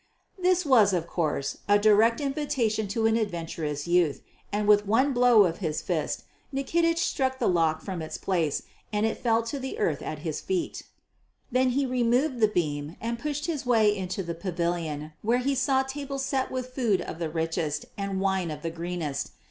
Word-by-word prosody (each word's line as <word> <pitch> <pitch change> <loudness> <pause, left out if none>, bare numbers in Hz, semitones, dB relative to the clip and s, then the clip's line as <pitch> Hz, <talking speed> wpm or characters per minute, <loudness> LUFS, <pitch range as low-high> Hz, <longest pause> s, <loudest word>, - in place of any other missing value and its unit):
This 365 -1 +2
was, 225 -8 +5
of 170 -2 0
course, 155 -5 -2
a 205 - +7
direct 215 +2 +4
invitation 270 -7 -1
to 220 +3 -1
an 225 0 +4
adventurous 165 -8 -3
youth, 170 -4 +2 0.3
and 205 0 -1
with 210 -1 +5
one 260 +7 +3
blow 245 -3 +6
of 170 -3 -1
his 160 -5 -2
fist - - -2 0.3
Nikitich 330 +5 +1
struck 265 -7 0
the - - 0
lock 160 -3 +2
from 185 -4 -4
its 155 - -5
place 165 -7 0 0.3
and 210 0 +1
it 225 - -1
fell 230 -1 +2
to 255 +5 -4
the 265 +10 -5
earth 430 -1 0
at - - -4
his - - -2
feet. 360 -4 -2 0.7
Then 255 +1 +3
he 280 - +2
removed 250 +2 +1
the 215 - +5
beam 155 -5 -2
and 235 +1 -3
pushed 295 +2 -3
his 320 -5 -2
way 220 -4 +4
into 190 0 -3
the 170 -1 -4
pavilion, 170 -4 -3
where 230 +3 +2
he 265 +3 0
saw 265 0 +2
tables 275 0 -4
set 265 -2 0
with 255 -1 -5
food 220 -9 +1
of 165 - -6
the 165 -2 -2
richest 160 -2 -2
and 195 -1 -3
wine 190 -3 0
of 150 0 -6
the 165 - -2
greenest. 170 -3 -3
210 Hz, 190 wpm, -27 LUFS, 170-260 Hz, 0.7 s, a